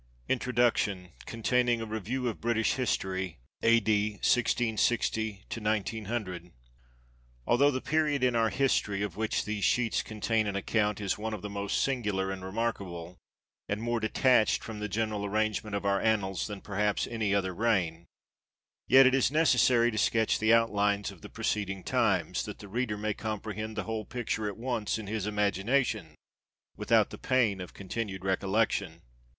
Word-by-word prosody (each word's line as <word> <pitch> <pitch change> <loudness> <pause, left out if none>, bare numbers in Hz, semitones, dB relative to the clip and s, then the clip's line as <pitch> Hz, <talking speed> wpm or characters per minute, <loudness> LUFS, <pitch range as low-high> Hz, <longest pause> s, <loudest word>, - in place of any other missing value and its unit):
INTRODUCTION 120 -7 +1 0.2
CONTAINING 120 +1 +1
A 115 - -4
REVIEW 110 +4 -3
OF 115 - -4
BRITISH 115 -1 +1
HISTORY 95 -8 -2 0.2
A.D. 110 -2 +3
I66O 110 -3 +1
I9OO. 105 -4 -3 0.9
ALTHOUGH 140 +4 +4
the 130 -1 -3
period 150 -3 +1
in 125 -1 +3
our 115 -1 +3
history, 110 -7 +1
of 105 - -4
which 110 0 -1
these 105 -1 -3
sheets 120 -3 +2
contain 110 0 -1
an 100 - -2
account, 105 +1 0
is 100 0 -2
one 110 0 -3
of - - -10
the 105 - -5
most 100 0 -1
singular 105 -8 -1
and 95 -1 -6
remarkable, 95 -4 -4 0.5
and 100 - -1
more 120 +1 -1
detached 110 +1 +3
from 110 -2 -7
the 105 0 -3
general 110 0 -1
arrangement 105 0 -1
of 100 - -3
our 100 0 +2
annals 100 -5 0
than 105 -2 -7
perhaps 105 0 0
any 110 -3 -1
other 95 -2 0
reign; 85 -6 0 0.8
yet 135 +1 +8
it 130 - +5
is 135 -3 +3
necessary 125 -5 +4
to 110 - -2
sketch 110 0 +2
the 110 +1 +3
outlines 105 -3 +2
of - - -15
the - - -10
preceding 95 -3 -2
times, - - +1
that - - -7
the 105 - -11
reader 110 +1 -2
may 105 0 -1
comprehend 110 0 -5
the 105 - -2
whole 110 +1 -3
picture 110 -3 -3
at 100 - -5
once 115 -3 -2
in 110 - -6
his 105 0 -3
imagination, 105 - 0 0.6
without - - +2
the - - -9
pain 115 -7 +1
of 90 - -9
continued 100 -1 -5
recollection. 95 -3 0
110 Hz, 155 wpm, -29 LUFS, 100-115 Hz, 0.9 s, yet